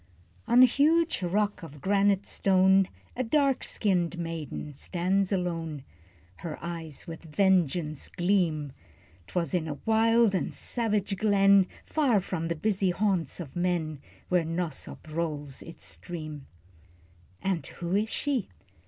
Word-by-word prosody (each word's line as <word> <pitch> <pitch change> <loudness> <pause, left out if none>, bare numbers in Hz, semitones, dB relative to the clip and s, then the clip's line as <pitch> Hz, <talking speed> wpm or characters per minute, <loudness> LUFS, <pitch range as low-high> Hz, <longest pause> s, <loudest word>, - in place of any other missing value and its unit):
On 245 +2 +7
a - - +11
huge 310 +3 +3
rock 205 +3 0
of 150 -3 -10
granite 200 +4 +2
stone, 190 0 +4 0.3
A 255 - 0
dark 275 +1 +2
skinned 180 -4 0
maiden 165 -3 -5
stands 185 +6 0
alone, 165 -6 -2 0.5
Her 160 -3 -6
eyes 165 -3 -6
with 165 -2 -8
vengeance 165 -3 +1
gleam. 175 -6 +1 0.6
'Twas 170 - -2
in 170 -3 0
a 145 -2 -4
wild 225 -1 +4
and 185 - 0
savage 210 -4 -1
glen, 200 -2 +5 0.2
Far 270 -9 +2
from 175 -3 -3
the 170 - -1
busy 195 +3 +1
haunts 180 -4 0
of 150 -7 -7
men, 175 -4 -1 0.3
Where 180 -2 +2
'Nosop 165 -2 -4
rolls 155 -3 -4
its 165 - -10
stream. 155 -5 -7 0.9
And 190 -4 -1
who 175 +1 -5
is 215 +2 +1
she? 270 -6 -1
180 Hz, 130 wpm, -28 LUFS, 165-205 Hz, 0.9 s, a